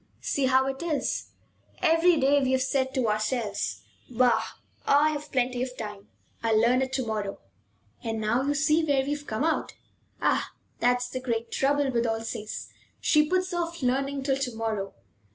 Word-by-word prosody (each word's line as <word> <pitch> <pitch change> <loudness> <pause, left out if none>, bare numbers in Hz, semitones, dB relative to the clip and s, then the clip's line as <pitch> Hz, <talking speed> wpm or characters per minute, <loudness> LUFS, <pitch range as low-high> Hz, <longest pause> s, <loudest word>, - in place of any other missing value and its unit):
See 275 -2 0
how 260 0 +4
it 270 0 -3
is! 320 -4 -1 0.5
Every 330 -1 +4
day 280 +1 +4
we 260 -1 +1
have 260 0 +2
said 265 -1 0
to 255 -3 +1
ourselves: 215 0 -1 0.3
'Bah! 250 -1 +3 0.4
I've 295 +1 +2
plenty 250 -1 0
of 255 0 -4
time. 210 -2 -7 0.3
I'll 225 -1 +3
learn 245 +3 +4
it 260 0 -1
to 260 -2 0
morrow.' 210 -3 -3 0.7
And 225 -1 -2
now 220 +4 +1
you 285 +2 0
see 305 +3 +3
where 280 -3 +2
we've 290 +1 -3
come 220 +5 -2
out. 320 0 0 0.4
Ah, - - +1 0.3
that's 245 0 +2
the 255 +1 -4
great 235 -2 -3
trouble 280 0 +1
with 235 -1 +1
Alsace; 225 -1 -4 0.3
she 300 -1 +3
puts 370 0 0
off 340 -3 -3
learning 275 +2 0
till 270 -1 +1
to 255 -4 -3
morrow. 220 -3 -3
260 Hz, 170 wpm, -27 LUFS, 230-285 Hz, 0.7 s, how